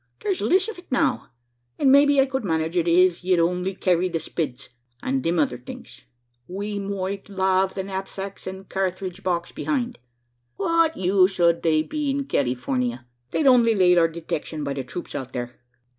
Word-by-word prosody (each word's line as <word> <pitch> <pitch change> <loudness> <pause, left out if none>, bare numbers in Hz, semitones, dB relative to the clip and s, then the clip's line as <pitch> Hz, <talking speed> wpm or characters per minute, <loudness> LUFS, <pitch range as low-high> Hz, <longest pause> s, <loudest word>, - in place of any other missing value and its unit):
There's 400 -3 -1
liss 375 +3 +3
of 450 -5 -6
it 355 - -18
now; 255 - +1 0.5
an' 270 - +4
maybe 285 0 +6
I 270 - +6
could 265 -2 -3
manage 160 -2 -1
it, 175 -1 +1
iv 180 +1 +4
you'ld 180 -1 +2
only 180 +3 0
carry 180 -1 +1
the 165 -1 -2
spids, 135 -6 -4 0.3
an' 135 +1 0
thim 170 +5 0
other 135 -6 +1
things. 125 - -11 0.4
We 200 +2 -4
moight 195 0 -4
lave 190 -1 +1
the 190 - -2
knapsicks 195 0 -6
an' 190 +1 -6
kyarthridge 190 -1 -3
box 175 -3 -1
behind. 250 -5 -2 0.6
What 330 -1 +2
use 185 0 +3
ud 170 -1 +4
they 155 -2 +2
be 300 - -3
in 275 0 -1
Kalifornya? 125 - -1 0.2
They'll 280 - +3
only 235 -3 +5
lade 180 -2 +5
to - - +6
our 165 - +5
detiction 160 -2 -5
by 140 -1 -2
the 135 - -3
throops 155 +7 -7
out 130 -2 -5
there." 120 -1 -5
185 Hz, 180 wpm, -24 LUFS, 165-205 Hz, 0.6 s, maybe